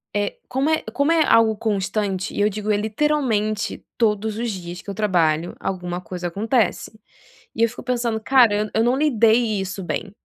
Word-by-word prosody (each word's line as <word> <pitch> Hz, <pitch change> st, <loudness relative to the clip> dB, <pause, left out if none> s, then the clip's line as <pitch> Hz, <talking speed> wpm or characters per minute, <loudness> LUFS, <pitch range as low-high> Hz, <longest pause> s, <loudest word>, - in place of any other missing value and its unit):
eh, 205 Hz, 0 st, -1 dB
como 265 Hz, +4 st, 0 dB
é 315 Hz, -, +1 dB
como 285 Hz, +7 st, +1 dB
é 325 Hz, -2 st, +4 dB
algo 225 Hz, -3 st, +4 dB
constante, 200 Hz, -2 st, -2 dB
e -, -, -1 dB
eu 210 Hz, -, +4 dB
digo 210 Hz, +1 st, -3 dB
é 205 Hz, -, +2 dB
literalmente 220 Hz, -2 st, -1 dB
todos 215 Hz, -1 st, 0 dB
os 235 Hz, -1 st, -1 dB
dias 180 Hz, -3 st, -6 dB
que -, -, -11 dB
eu 195 Hz, -, -5 dB
trabalho, 175 Hz, -6 st, +1 dB
alguma 180 Hz, -1 st, -4 dB
coisa 180 Hz, 0 st, -5 dB
acontece, 215 Hz, +1 st, -1 dB, 0.6 s
e 225 Hz, -, -3 dB
eu 230 Hz, -, +4 dB
fico 220 Hz, -, -10 dB
pensando: 235 Hz, -3 st, -1 dB
"Cara, 240 Hz, -4 st, +5 dB
eu, 210 Hz, +1 st, -1 dB
eu 225 Hz, -, +3 dB
não 245 Hz, +2 st, +2 dB
lidei 230 Hz, -6 st, +3 dB
isso 190 Hz, 0 st, -5 dB
bem". 185 Hz, +4 st, -4 dB
215 Hz, 185 wpm, -22 LUFS, 195-235 Hz, 0.6 s, Cara